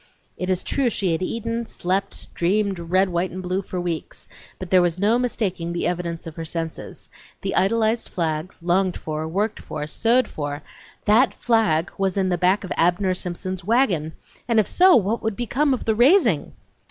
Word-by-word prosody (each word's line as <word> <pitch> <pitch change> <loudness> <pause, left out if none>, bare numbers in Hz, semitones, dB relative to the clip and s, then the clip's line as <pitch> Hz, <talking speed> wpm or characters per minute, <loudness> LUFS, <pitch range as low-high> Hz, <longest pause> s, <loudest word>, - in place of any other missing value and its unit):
It 185 - -4
is 185 -1 0
true 275 -3 +1
she 195 -5 -1
had 165 - -1
eaten, 230 +3 -3
slept, 190 0 -3
dreamed 195 +2 0
red, 185 +3 +1
white, 175 +1 -1
and 185 +1 -7
blue 185 +2 -1
for 185 -1 -5
weeks, 170 -3 -4 0.3
but 185 -2 -8
there 185 -1 +6
was 175 -1 +1
no 215 +5 +2
mistaking 190 -8 -2
the 170 - -1
evidence 175 -1 -2
of 165 -1 -9
her 165 - -4
senses; 165 0 -5 0.3
the - - -2
idolized 220 +4 +1
flag, 160 0 -2
longed 180 +1 +1
for, 155 0 -4
worked 205 +6 -1
for, 150 -1 -5
sewed 230 +11 +2
for, 145 -1 -5 0.4
that 225 +6 +4
flag 215 -9 +1
was 195 -1 0
in 190 -1 +1
the 175 - +1
back 185 +3 +2
of 190 - -3
Abner 180 +3 +2
Simpson's 185 +1 -4
wagon, 185 - +1 0.3
and 230 -2 +3
if 215 - +2
so, 370 0 +6
what 220 +2 +1
would 220 -2 -2
become 265 +6 0
of 260 - -1
the 220 - +2
raising? 240 - +3
185 Hz, 185 wpm, -23 LUFS, 170-220 Hz, 0.4 s, there